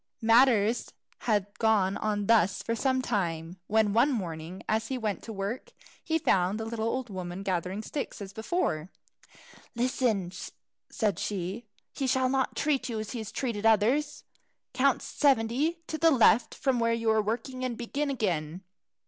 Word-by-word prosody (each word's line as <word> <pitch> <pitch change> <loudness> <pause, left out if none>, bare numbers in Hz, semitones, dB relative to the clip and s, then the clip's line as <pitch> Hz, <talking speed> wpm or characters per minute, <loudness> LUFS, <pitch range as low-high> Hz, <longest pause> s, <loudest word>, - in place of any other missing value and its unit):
Matters 230 -1 +4 0.4
had 205 -3 +3
gone 210 -4 +3
on 205 -1 -1
thus 205 -4 +3
for 230 - -1
some 260 +2 +1
time, 170 -6 -2
when 215 -1 +2
one 240 +6 +4
morning, 175 -5 -5
as 220 +1 0
he 265 - -2
went 215 -4 -2
to 225 - -8
work, 200 +4 -5 0.3
he 320 -1 +1
found 195 - +1
the 225 - -3
little 225 0 -2
old 255 -1 -2
woman 185 0 -5
gathering 185 +2 -2
sticks 285 +5 -5
as 200 -1 -8
before. 220 - -1 0.9
"Listen," 235 -6 0 0.6
said 210 -4 -1
she. 200 +3 -4 0.3
"He 270 - -2
shall 260 0 +2
not 265 0 0
treat 285 -3 0
you 225 -2 -3
as 215 -1 -5
he 245 - -4
has 220 - -6
treated 230 -6 -3
others. 225 +7 +2 0.5
Count 265 +1 +2
seventy 280 +5 +1
to 315 - -5
the 330 - +5
left 240 -4 +4
from 265 -3 0
where 230 0 +2
you 230 -1 +1
are 220 0 +3
working, 250 +4 -3
and 245 -3 -2
begin 280 +5 -2
again. 180 - -2
225 Hz, 165 wpm, -28 LUFS, 200-255 Hz, 0.9 s, the